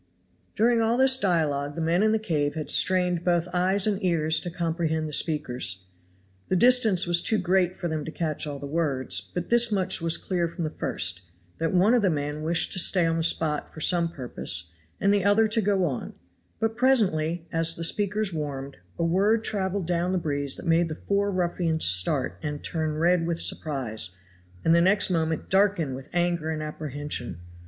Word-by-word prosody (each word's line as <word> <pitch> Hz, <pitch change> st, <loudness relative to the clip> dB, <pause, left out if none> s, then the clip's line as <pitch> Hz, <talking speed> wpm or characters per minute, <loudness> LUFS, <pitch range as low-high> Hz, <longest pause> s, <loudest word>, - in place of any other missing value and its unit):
During 230 Hz, 0 st, +2 dB
all 225 Hz, +2 st, +1 dB
this 265 Hz, 0 st, +5 dB
dialogue 155 Hz, -, 0 dB
the -, -, -5 dB
men 165 Hz, +3 st, +1 dB
in 215 Hz, 0 st, +3 dB
the 220 Hz, -, +2 dB
cave 155 Hz, -9 st, -2 dB
had 155 Hz, -1 st, -2 dB
strained 180 Hz, -2 st, +2 dB
both 175 Hz, -1 st, +1 dB
eyes 185 Hz, +2 st, +1 dB
and 210 Hz, -1 st, -1 dB
ears 160 Hz, -3 st, +2 dB
to 175 Hz, -, -6 dB
comprehend 165 Hz, -2 st, -2 dB
the 150 Hz, -, -7 dB
speakers. 125 Hz, -, -1 dB, 0.7 s
The -, -, +1 dB
distance 225 Hz, -3 st, +4 dB
was 170 Hz, -1 st, +3 dB
too 220 Hz, -, 0 dB
great 185 Hz, -1 st, +1 dB
for 175 Hz, -, -3 dB
them 155 Hz, -2 st, -3 dB
to 160 Hz, -, -6 dB
catch 155 Hz, -2 st, -2 dB
all 145 Hz, -1 st, -5 dB
the 140 Hz, -, -8 dB
words, 135 Hz, -, 0 dB
but 175 Hz, -, -7 dB
this 235 Hz, -1 st, +4 dB
much 190 Hz, -3 st, 0 dB
was 165 Hz, 0 st, +1 dB
clear 175 Hz, -3 st, -2 dB
from 170 Hz, +1 st, -6 dB
the 155 Hz, -, -3 dB
first, 90 Hz, -, -1 dB, 0.4 s
that 165 Hz, 0 st, -1 dB
one 190 Hz, +5 st, +3 dB
of 245 Hz, -, +3 dB
the 195 Hz, -, +2 dB
men 150 Hz, -1 st, -3 dB
wished 165 Hz, +2 st, +1 dB
to -, -, +1 dB
stay 180 Hz, 0 st, +3 dB
on 165 Hz, 0 st, 0 dB
the -, -, -1 dB
spot 160 Hz, -2 st, 0 dB
for -, -, -11 dB
some 170 Hz, +1 st, +2 dB
purpose, 120 Hz, -, -2 dB, 0.3 s
and 200 Hz, +1 st, +2 dB
the 200 Hz, -2 st, +1 dB
other 205 Hz, +3 st, +4 dB
to 225 Hz, +1 st, +2 dB
go 195 Hz, -2 st, +1 dB
on; 135 Hz, -7 st, -5 dB, 0.4 s
but 225 Hz, 0 st, -1 dB
presently, 180 Hz, -10 st, +1 dB
as 165 Hz, 0 st, +1 dB
the 165 Hz, -, -5 dB
speakers 205 Hz, +2 st, 0 dB
warmed, 140 Hz, -3 st, -5 dB, 0.2 s
a -, -, -1 dB
word 205 Hz, +6 st, +2 dB
traveled 195 Hz, -3 st, -2 dB
down 175 Hz, +2 st, -1 dB
the -, -, +1 dB
breeze 145 Hz, -5 st, -1 dB
that -, -, -9 dB
made 165 Hz, 0 st, +2 dB
the 155 Hz, -, -5 dB
four 200 Hz, +4 st, -1 dB
ruffians 175 Hz, -3 st, 0 dB
start 90 Hz, -, +2 dB
and 150 Hz, -2 st, -5 dB
turn 155 Hz, -2 st, -2 dB
red 170 Hz, +1 st, +2 dB
with 170 Hz, -1 st, -1 dB
surprise, 125 Hz, -, -1 dB, 0.6 s
and 165 Hz, -, +4 dB
the 170 Hz, -, +4 dB
next 190 Hz, +2 st, +3 dB
moment 160 Hz, -2 st, -1 dB
darken 190 Hz, -7 st, +1 dB
with 135 Hz, +2 st, -9 dB
anger 175 Hz, -2 st, -1 dB
and 155 Hz, -1 st, -3 dB
apprehension. 145 Hz, -, -5 dB
170 Hz, 195 wpm, -25 LUFS, 155-190 Hz, 0.7 s, this